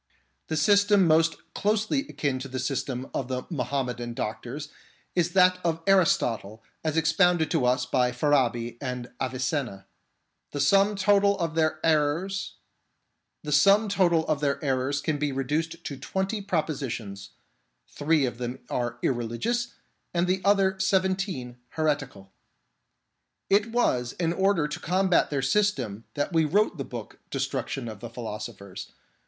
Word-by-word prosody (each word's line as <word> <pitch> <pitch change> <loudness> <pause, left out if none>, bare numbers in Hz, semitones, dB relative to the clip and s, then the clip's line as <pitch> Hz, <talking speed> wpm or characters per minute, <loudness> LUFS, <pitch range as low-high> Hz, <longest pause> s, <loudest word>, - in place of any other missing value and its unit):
The 160 - -2
system 200 +4 +4
most 165 0 +3 0.2
closely 220 +7 0
akin 140 -3 -1
to 135 - -6
the 130 0 -5
system 130 -1 -2
of 130 - -2
the 130 -1 -3
Muhammedan 125 -4 -2
doctors 120 +8 -5 0.4
is 175 -1 +1
that 180 -1 +5
of 165 -1 -1
Aristotle 115 - +2 0.2
as 160 0 -1
expounded 165 0 +3
to 155 -7 +2
us 125 +1 +2
by 125 -1 +1
Farabi 125 -3 +1
and 125 -2 -5
Avicenna. 130 -5 -2 0.7
The 145 - -3
sum 195 +8 +4
total 200 0 +3
of 165 -3 -2
their 160 -1 +1
errors 160 +5 +1 1.0
can 150 -6 +2
be 145 -1 0
reduced 155 +5 -2
to 140 - -5
twenty 190 +8 -2
propositions: 130 - -3 0.6
three 150 -1 +1
of 120 -1 -4
them 125 +1 -4
are 120 -1 -2
irreligious, 135 - -1 0.4
and 170 +1 +3
the 185 +1 0
other 195 -1 +3
seven 190 -1 +2
teen 135 - -5 0.2
heretical. 135 -11 -2 1.2
It 205 +3 +3
was 125 - +1
in 170 -1 -1
order 190 -4 +2
to 150 - -5
combat 185 +1 +2
their 140 -3 -1
system 135 - 0
that 145 +5 -2
we 160 -1 +4
wrote 175 +2 +1
the - - -1
work 120 -4 -8
Destruction 130 -3 -3
of 110 -3 -7
the 120 - -7
Philosophers. 105 -4 -7
150 Hz, 130 wpm, -26 LUFS, 125-185 Hz, 1.2 s, that